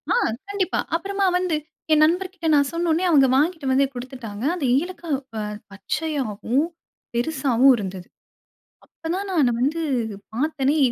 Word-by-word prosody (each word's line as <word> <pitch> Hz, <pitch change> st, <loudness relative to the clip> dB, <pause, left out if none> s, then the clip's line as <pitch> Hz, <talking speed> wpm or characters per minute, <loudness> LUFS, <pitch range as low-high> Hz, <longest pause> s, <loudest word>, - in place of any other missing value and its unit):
ஆ -, -, +3 dB, 0.3 s
கண்டிப்பா. 395 Hz, -2 st, -1 dB, 0.2 s
அப்புறமா 395 Hz, +3 st, -1 dB
வந்து 360 Hz, -3 st, 0 dB, 0.4 s
என் 305 Hz, -, +5 dB
நண்பர்கிட்ட 360 Hz, +1 st, -1 dB
நான் 285 Hz, -1 st, +3 dB
சொன்னவுன்னே, 335 Hz, +1 st, +1 dB
அவுங்க 280 Hz, -5 st, +6 dB
வாங்கிட்டு 310 Hz, 0 st, +1 dB
வந்து 275 Hz, +1 st, +4 dB
குடுத்துட்டாங்க. 245 Hz, -4 st, -7 dB
அந்த 325 Hz, -6 st, -2 dB
ஏலக்காய் 340 Hz, -2 st, -3 dB, 0.2 s
அ -, -, -2 dB, 0.3 s
பச்சையாவும், 255 Hz, +3 st, -1 dB, 0.5 s
பெருசாவும் 265 Hz, -1 st, +3 dB
இருந்தது. 190 Hz, -3 st, -6 dB, 0.8 s
அப்போதான் 360 Hz, +5 st, -4 dB
நான் 335 Hz, -, +2 dB
அத 245 Hz, -, +3 dB
வந்து 315 Hz, +5 st, 0 dB, 0.5 s
பாத்தனே! 290 Hz, +2 st, +1 dB
300 Hz, 125 wpm, -23 LUFS, 260-340 Hz, 0.8 s, அவுங்க